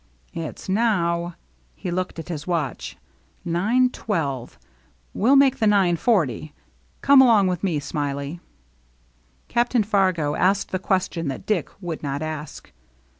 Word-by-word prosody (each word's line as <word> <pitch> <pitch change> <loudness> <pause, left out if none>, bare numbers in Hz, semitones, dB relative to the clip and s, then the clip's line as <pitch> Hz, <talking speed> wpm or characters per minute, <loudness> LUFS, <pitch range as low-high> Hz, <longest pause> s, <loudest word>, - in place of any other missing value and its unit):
"It's 165 -2 -6
now 175 -5 0
— - - -38
" - - -37
he 180 - -5
looked 180 0 -3
at 165 +1 -7
his 155 -2 -5
watch 165 -7 -3 0.2
— 65 - -37
"nine 220 +10 +2
twelve. 140 - -3 0.6
We'll 250 +7 +3
make 270 -1 +4
the 220 - +2
nine 195 -4 +3
forty. 160 - 0 0.5
Come 275 -1 +7
along 225 -6 +5
with 180 -1 -1
me. 170 -6 0
Smiley." 140 +2 -4 1.1
Captain 240 -1 +1
Fargo 185 -8 +1
asked 195 +5 +1
the 185 - -1
question 185 -4 -1
that 135 +6 -5
Dick 205 -8 0
would 170 -4 -5
not 145 +1 -3
ask. 155 -1 -7
175 Hz, 145 wpm, -23 LUFS, 155-210 Hz, 1.1 s, Come